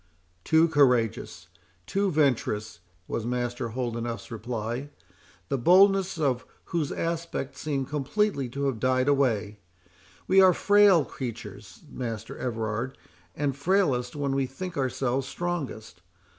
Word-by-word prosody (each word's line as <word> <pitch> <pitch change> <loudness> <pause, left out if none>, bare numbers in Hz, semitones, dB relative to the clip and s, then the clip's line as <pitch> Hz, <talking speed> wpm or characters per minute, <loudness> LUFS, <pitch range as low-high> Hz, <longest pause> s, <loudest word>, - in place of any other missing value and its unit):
"Too 160 +1 +4
courageous—too 115 - 0
venturous" 115 - 0 0.3
was 115 - -3
Master 120 0 -2
Holdenough's 120 -1 -4
reply, 120 +4 -4 0.6
the 135 - -1
boldness 190 +5 +5
of 135 -5 0 0.3
whose 160 -5 0
aspect 165 -4 -3
seemed 140 -4 -2
completely 145 - -1
to 140 +3 -3
have 130 -5 -1
died 130 +2 +1
away. 110 -7 +1 0.7
"We 190 +1 +6
are 185 -1 +7
frail 205 -6 +5
creatures, 105 -7 -8
Master 115 -5 -5
Everard, 115 +1 -3 0.4
and 140 -2 -1
frailest 140 -6 +1
when 140 -2 -1
we 135 -1 0
think 180 +8 -7
ourselves 130 -1 -1
strongest. 130 - -5
130 Hz, 115 wpm, -27 LUFS, 115-155 Hz, 0.7 s, are